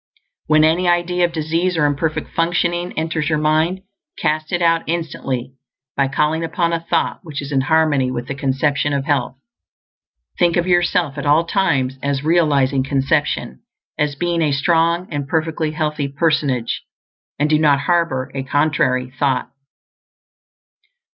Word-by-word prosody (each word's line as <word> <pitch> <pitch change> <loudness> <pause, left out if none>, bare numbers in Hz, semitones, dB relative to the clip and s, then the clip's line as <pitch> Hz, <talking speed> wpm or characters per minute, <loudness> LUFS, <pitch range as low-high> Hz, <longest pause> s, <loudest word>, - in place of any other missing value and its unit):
When 155 0 +4
any 165 +3 +2
idea 175 0 +2
of 175 - -3
disease 165 +2 -1
or 150 - +3
imperfect 145 +2 -1
functioning 175 +1 0
enters 160 -1 -1
your 155 - +1
mind, 155 +5 +1 0.4
cast 155 0 -1
it 175 - 0
out 165 -1 +3
instantly 135 -6 -3 0.4
by 140 -1 +2
calling 150 +4 0
up 165 - -6
a 170 -2 +1
thought 165 0 -1
which 155 -5 -7
is 140 0 -6
in 135 -2 +2
harmony 145 -2 +2
with 120 -1 -4
the 140 - -4
Conception 140 +1 0
of 140 -1 -1
Health. 135 -4 -1 1.0
Think 175 -1 +3
of 175 - +1
yourself 175 -4 +1
at 140 - -3
all 155 +3 +4
times 135 -9 0
as 140 -1 -1
realizing 145 -5 +2
conception; 135 - -1 0.3
as 150 -1 -1
being 170 +2 -1
a 150 -2 +2
strong 170 +4 +1
and 145 -2 -3
perfectly 160 0 -1
healthy 150 -2 -2
personage; 140 -4 0 0.6
and 145 - +1
do 155 0 +2
not 145 -3 +3
harbor 165 -6 0
a 135 - -3
contrary 135 -2 0
thought. 135 -3 0
155 Hz, 150 wpm, -19 LUFS, 140-170 Hz, 1.0 s, When